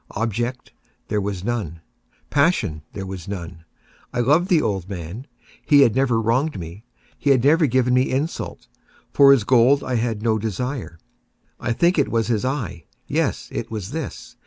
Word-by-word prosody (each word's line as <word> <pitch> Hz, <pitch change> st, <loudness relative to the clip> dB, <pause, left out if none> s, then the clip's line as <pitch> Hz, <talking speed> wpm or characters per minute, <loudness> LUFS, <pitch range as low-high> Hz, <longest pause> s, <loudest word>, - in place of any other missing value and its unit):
Object 120 Hz, +4 st, -3 dB, 0.4 s
there 105 Hz, -, 0 dB
was 100 Hz, -2 st, -4 dB
none. 105 Hz, -8 st, -3 dB, 0.5 s
Passion 140 Hz, -, +1 dB
there 100 Hz, -1 st, -5 dB
was 95 Hz, -3 st, -7 dB
none. 85 Hz, -4 st, -7 dB, 0.5 s
I -, -, -3 dB
loved 155 Hz, -, +3 dB
the 175 Hz, -4 st, +5 dB
old 100 Hz, -, -2 dB
man. 95 Hz, -, -7 dB, 0.4 s
He 145 Hz, -2 st, +5 dB
had 120 Hz, -6 st, +4 dB
never 125 Hz, -4 st, +2 dB
wronged 115 Hz, +2 st, 0 dB
me. 85 Hz, +5 st, -9 dB, 0.4 s
He 145 Hz, -, 0 dB
had 130 Hz, -3 st, +4 dB
never 155 Hz, +3 st, +4 dB
given 125 Hz, 0 st, +2 dB
me 125 Hz, +1 st, +3 dB
insult. 140 Hz, +5 st, -3 dB, 0.5 s
For 140 Hz, -1 st, +7 dB
his 135 Hz, -6 st, +5 dB
gold 130 Hz, +5 st, +4 dB
I 125 Hz, -2 st, -1 dB
had 115 Hz, -2 st, -2 dB
no 110 Hz, -2 st, +2 dB
desire. 115 Hz, -1 st, -4 dB, 0.6 s
I -, -, -2 dB
think 170 Hz, +8 st, +2 dB
it 140 Hz, -, +2 dB
was 115 Hz, -1 st, +1 dB
his 115 Hz, -4 st, 0 dB
eye! 120 Hz, -, -3 dB, 0.2 s
yes, -, -, -1 dB
it -, -, -4 dB
was 105 Hz, -2 st, -5 dB
this! 160 Hz, -2 st, -6 dB
120 Hz, 170 wpm, -22 LUFS, 100-135 Hz, 0.6 s, For